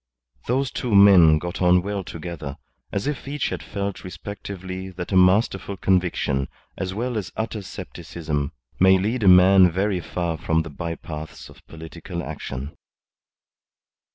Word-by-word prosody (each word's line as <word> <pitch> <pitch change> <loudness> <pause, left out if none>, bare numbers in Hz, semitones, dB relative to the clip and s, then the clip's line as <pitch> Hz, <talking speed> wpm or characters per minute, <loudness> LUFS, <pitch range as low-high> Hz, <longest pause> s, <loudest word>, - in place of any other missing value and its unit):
Those 130 +2 0
two 120 -5 -1
men 95 -6 +8
got 85 +4 -5
on 90 0 +4
well 100 0 -3
together, 80 -5 -7 0.3
as 100 - -2
if 145 -2 -3
each 145 -1 -2
had - - -4
felt 100 -1 -4
respectively 95 -1 -7
that 90 0 -7
a - - +1
masterful 95 +1 +3
conviction, 90 -8 +1 0.3
as 95 -1 -3
well 115 +3 -2
as 95 - -7
utter 110 -1 -3
scepticism, 75 -6 -5 0.3
may 95 +1 +6
lead 110 +6 -1
a 100 - +2
man 90 0 +7
very 95 +2 0
far 85 -1 -3
on 80 0 +3
the 80 - -9
by 85 +3 -4
paths 80 -1 -8
of - - -17
political 85 +2 -7
action. 70 +4 -6
95 Hz, 150 wpm, -23 LUFS, 85-100 Hz, 0.3 s, men